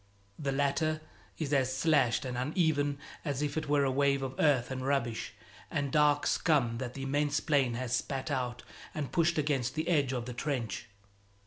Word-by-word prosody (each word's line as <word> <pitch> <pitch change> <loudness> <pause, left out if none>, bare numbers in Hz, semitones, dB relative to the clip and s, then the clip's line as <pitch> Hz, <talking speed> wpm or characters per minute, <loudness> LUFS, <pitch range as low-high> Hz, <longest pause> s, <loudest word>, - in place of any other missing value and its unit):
The 140 -2 -1
latter 145 +3 +1 0.4
is 150 -2 -2
as 130 -2 +2
slashed 140 -5 +3
and 125 -1 -3
uneven 145 +1 +1 0.3
as 145 -2 -2
if 145 -1 -2
it 155 -2 -2
were 145 -1 +4
a 135 - +2
wave 140 0 +2
of 130 -1 -3
earth 135 -5 +3
and 130 -1 -3
rubbish 130 -4 -1 0.3
and 140 -1 -1
dark 150 -1 +4
scum 125 -8 +2
that 125 -2 -5
the 135 - -5
immense 145 +2 +1
plain 140 -6 +2
has 125 0 -1
spat 135 +3 -3
out 125 -3 -2 0.3
and 145 -3 -3
pushed 170 -1 +2
against 140 -4 0
the 160 +1 -2
edge 145 -7 +2
of 125 -3 -2
the 125 - -5
trench. 120 -4 -3
140 Hz, 185 wpm, -31 LUFS, 130-150 Hz, 0.4 s, were